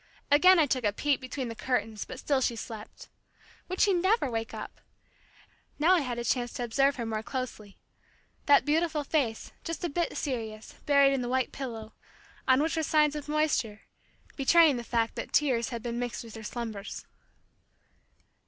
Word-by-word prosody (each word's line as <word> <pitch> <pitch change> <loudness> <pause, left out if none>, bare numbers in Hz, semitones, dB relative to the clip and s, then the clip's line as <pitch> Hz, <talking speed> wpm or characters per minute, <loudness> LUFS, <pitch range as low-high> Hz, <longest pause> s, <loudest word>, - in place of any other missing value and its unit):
Again 365 +6 +7
I 320 - +5
took 255 -3 -1
a 205 - +2
peep 280 +6 0
between 255 0 -4
the 230 - -5
curtains 225 -3 -2
but - - -8
still 280 -2 +1
she 240 - 0
slept. 220 -2 -9 0.6
Would 370 +1 -5
she 400 - +4
never 370 - +2
wake 225 0 -3
up? - - -8 1.0
Now 325 +5 +4
I 365 - +4
had 250 -5 -3
a 240 - -3
chance 240 0 0
to 245 - -4
observe 275 +4 +2
her 235 - -4
more 220 -1 -2
closely. 220 -5 -6 0.7
That 285 -1 +6
beautiful 310 0 +1
face, 270 -7 -1
just 330 +2 -5
a 345 - 0
bit 340 +3 -2
serious, 220 -6 -4
buried 280 -1 +5
in 270 - 0
the 245 - -3
white 260 0 0
pillow, 225 -5 -7 0.5
on 260 +2 +5
which 320 - -1
were 320 - 0
signs 300 -1 +2
of 295 0 -6
moisture, 300 -9 0 0.5
betraying 305 0 +5
the 240 - -5
fact 230 -1 0
that - - -6
tears 255 -6 +2
had 235 -3 -6
been 235 0 -3
mixed 245 -1 -4
with 225 -2 -11
her 225 - -8
slumbers. 220 -2 -6
260 Hz, 180 wpm, -29 LUFS, 230-295 Hz, 1.0 s, Again